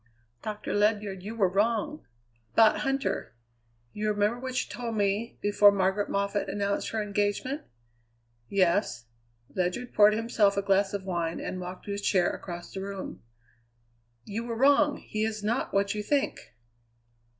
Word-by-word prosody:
"Doctor 215 -1 -4
Ledyard, 205 -2 +1
you 210 +4 -6
were 200 -4 +3
wrong 220 +9 0 0.5
about 220 -1 +6
Huntter! 270 0 -1 0.6
You 215 0 -1
remember 210 +3 +1
what 255 0 -2
you - - -2
told 235 -2 -4
me, 205 +3 0
before 205 0 +6
Margaret 195 +1 +1
Moffatt 200 +1 -1
announced 200 0 -1
her 220 -1 -1
engagement?" 205 +8 -1 0.9
"Yes." 185 - +1 0.5
Ledyard 185 +7 -2
poured 210 0 +6
himself 220 -3 +2
a 200 - +1
glass 195 0 +2
of 200 - -4
wine 170 -3 -2
and 185 - -4
walked 180 +1 -7
to 205 - -5
his 200 0 -3
chair 185 -3 +2
across 175 -1 -8
the 190 - -4
room. 195 -1 -6 1.0
"You 215 +3 -4
were 235 -1 -4
wrong; 285 +3 +4
he 215 0 -3
is 220 -1 -2
not 230 +5 0
what 200 0 +1
you 210 - -3
think." 275 - -1
205 Hz, 150 wpm, -28 LUFS, 195-225 Hz, 1.0 s, about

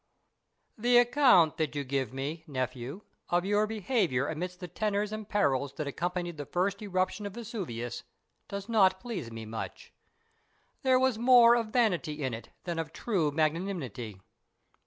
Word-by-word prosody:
The 240 +2 +4
account 240 - +5
that 155 -3 -1
you 145 - -1
give 130 -3 -2
me, 145 +5 -4
nephew, 130 +4 -4 0.3
of 175 +1 +2
your 205 +2 +2
behaviour 200 - 0
amidst 180 +3 -4
the 180 - -6
tenors 210 +2 -1
and 215 -1 -6
perils 140 -10 +1
that 155 - -4
accompanied 175 +3 -3
the 145 -2 -6
first 195 +3 0
eruption 200 +1 -1
of 200 - -9
Vesuvius 120 - -5 0.5
does 200 0 -6
not 190 -5 +4
please 205 - -5
me 115 -1 -7
much. 110 +1 -7 0.9
There 260 -1 +4
was 260 -4 +2
more 240 -1 +7
of 230 -2 0
vanity 180 - 0
in 130 -2 -1
it 115 - -7
than 170 -2 -3
of 165 - -4
true 185 -10 0
magnanimity. 150 - -2
180 Hz, 155 wpm, -30 LUFS, 140-215 Hz, 0.9 s, more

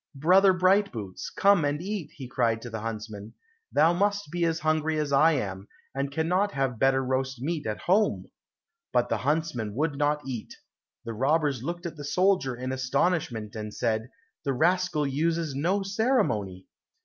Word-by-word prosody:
"Brother 185 +7 +5
Brightboots, 185 - +1
come 200 -4 +4
and 145 0 0
eat," 195 -1 -4 0.2
cried 115 -3 +1
he - - -15
to 120 - -7
the 110 - -4
huntsman; 110 -1 -6 0.4
"thou 160 +3 +4
must 205 -1 0
be 175 0 0
as 165 0 -1
hungry 155 0 +1
as 150 -2 -1
I 155 +4 +5
am, 100 -7 -3 0.3
and 135 +1 -2
cannot 180 +7 0
have 135 -4 -1
better 135 0 +3
roast 130 0 -1
meat 150 0 -3
at 105 - -3
home," 205 +5 +2 0.7
but 125 -1 +1
the - - +1
huntsman 140 -7 -1
would 145 +1 -1
not 150 0 +1
eat. 120 -5 -6 0.5
The 115 - -4
robbers 140 +2 +1
looked 170 +5 -5
at 165 -2 -5
the 145 - -7
soldier 180 -4 +1
in 130 +2 -4
astonishment, 130 - -1
and 105 -1 -5
said, 110 +1 -1 0.3
"The 140 - 0
rascal 170 +1 +1
uses 160 +2 0
no 180 +9 0
ceremony." 195 - 0
145 Hz, 165 wpm, -27 LUFS, 125-170 Hz, 0.7 s, Brother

